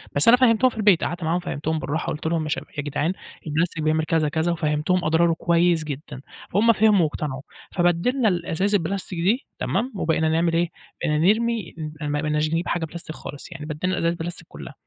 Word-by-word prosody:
بس 145 - +5
أنا 240 +2 +8
فَهّمتهم 250 0 +4
في 240 - -13
البيت 205 -5 +4
قعدت 175 -1 -3
معاهم 165 +3 +1
فَهّمتهم 160 -2 -3
بالرّاحة، 150 +3 -3
قلت 150 - -6
لهم: 165 -1 0
"يا 155 - -4
شب - - -2
يا 145 - -1
جدعان 145 +4 -1 0.3
البلاستيك 160 +1 -1
بيعمل 155 +1 +2
كذا 155 -2 +1
كذا"، 160 +3 0
وفَهّمتهم 155 +2 0
أضراره 165 +2 +3
كويس 170 0 +2
جدًا، 145 -2 -7 0.3
فهُم 225 +5 +4
فهموا 210 -3 +4
واقتنعوا. 150 -3 -3 0.3
فبدّلنا 180 +8 +2
الأزايز 185 +2 0
البلاستيك 180 0 -2
دي، 205 +10 +1
تمام؟ 235 +7 -1
وبقينا 160 -3 +1
نعمل 165 +1 +2
إيه، 170 +1 +1 0.3
بقينا 150 - +1 0.2
نرمي 230 -5 -2 0.3
ما 145 0 -1
بقيناش 150 0 0
نجيب 165 +2 -1
حاجة 170 -2 -1
بلاستيك 160 -1 -8
خالص. 145 +5 -9
يعني 160 -3 -7
بدّلنا 155 +5 -2
الأزايز 170 -1 +1
البلاستيك 170 0 -6
كلها. - - -10
165 Hz, 190 wpm, -23 LUFS, 155-185 Hz, 0.3 s, أنا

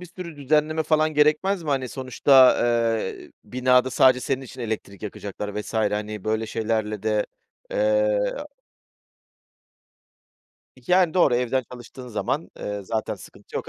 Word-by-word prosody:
bir 180 - -9
sürü 170 -2 -9
düzenleme 155 +3 +1
falan 155 0 +1
gerekmez 155 +6 +2
mi? 160 - -8
Hani, 130 -2 0
sonuçta, 130 +1 +4
eee, 115 -3 -1
binada 125 0 +2
sadece 130 0 +4
senin 130 +1 -2
için 130 0 -11
elektrik 110 -4 -5
yakacaklar 105 0 -5
vs. 105 - -9
hani, 105 -1 -1
böyle 110 +1 -1
şeylerle 110 -2 -2
de, 105 -1 0 0.4
eee, - - +2 0.2
a - - -6 2.4
Yani, 180 -2 +3
doğru 175 -9 +4
evden 125 +2 0
çalıştığın 125 +1 -10
zaman, 135 +7 -3
ııı, 105 -1 -5
zaten 110 +3 -2
sıkıntı - - -12
yok - - -5
125 Hz, 135 wpm, -24 LUFS, 110-155 Hz, 2.4 s, sonuçta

